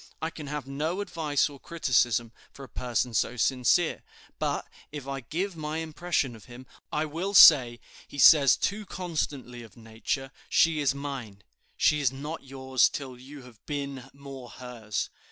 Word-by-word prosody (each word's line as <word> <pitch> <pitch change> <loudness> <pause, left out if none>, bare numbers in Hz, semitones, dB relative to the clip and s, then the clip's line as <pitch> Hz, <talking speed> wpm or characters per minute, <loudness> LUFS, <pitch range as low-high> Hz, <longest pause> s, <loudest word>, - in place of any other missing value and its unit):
I 160 - -3
can 155 -3 -9
have 150 -1 -4
no 155 +7 -3
advice 160 -7 0
or 145 -2 -12
criticism 120 -8 +1 0.2
for 140 - -12
a - - -17
person 120 -1 -2
so 120 +3 0
sincere; 130 +7 +2 0.4
but, - - -2 0.2
if 145 -3 -7
I 135 0 -3
give 175 - -4
my 155 0 -4
impression 160 -5 -2
of 110 - -15
him, 125 +1 -12 0.3
I 150 +1 0
will 170 +7 -4
say, 125 -9 +8 0.3
'He - - -11
says 140 +1 +7
too 205 +1 -2
constantly 145 -8 -4
of 115 -2 -14
Nature, 115 +4 -4 0.2
she 165 -2 +3
is 140 -2 +1
mine.' 130 -9 -7 0.3
She 150 - +3
is 140 -4 +2
not 145 +4 -7
yours 130 -1 +1
till 135 -3 -6
you 135 +2 -12
have 120 -4 -17
been 140 -3 -5
more 135 -3 -10
hers. 120 -4 -5
140 Hz, 165 wpm, -27 LUFS, 125-155 Hz, 0.4 s, say